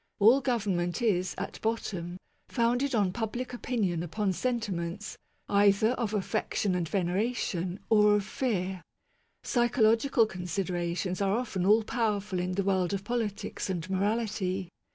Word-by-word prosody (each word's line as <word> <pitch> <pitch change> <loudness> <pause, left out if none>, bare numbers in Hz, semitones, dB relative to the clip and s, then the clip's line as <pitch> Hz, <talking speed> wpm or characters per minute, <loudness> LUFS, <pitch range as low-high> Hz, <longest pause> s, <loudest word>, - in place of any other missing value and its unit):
All 230 +7 +6
government 200 -9 0
is, 185 -5 +1
at 200 - -5
bottom, 185 -6 -2 0.3
founded 245 +2 +1
on 200 -4 +2
public 240 +3 -3
opinion 210 -9 -1
upon 190 +3 -1
sentiments 205 -4 -3 0.3
either 200 +1 +4
of 225 -4 -2
affection 205 -1 -1
and 175 -3 -1
veneration 190 -1 -1
or 210 -1 +5
of 205 -2 0
fear. 190 -7 -2 0.6
Psycho 240 -1 +2
logical 230 +2 +4
considerations 180 -1 -2
are 195 0 +2
often 195 -7 -1
all 215 +2 +5
powerful 210 -4 -1
in 180 +1 -1
the 195 +2 0
world 190 -1 +1
of 195 - -5
politics 210 -4 -3
and 175 -2 -3
morality. 195 -2 -1
200 Hz, 135 wpm, -29 LUFS, 185-225 Hz, 0.6 s, All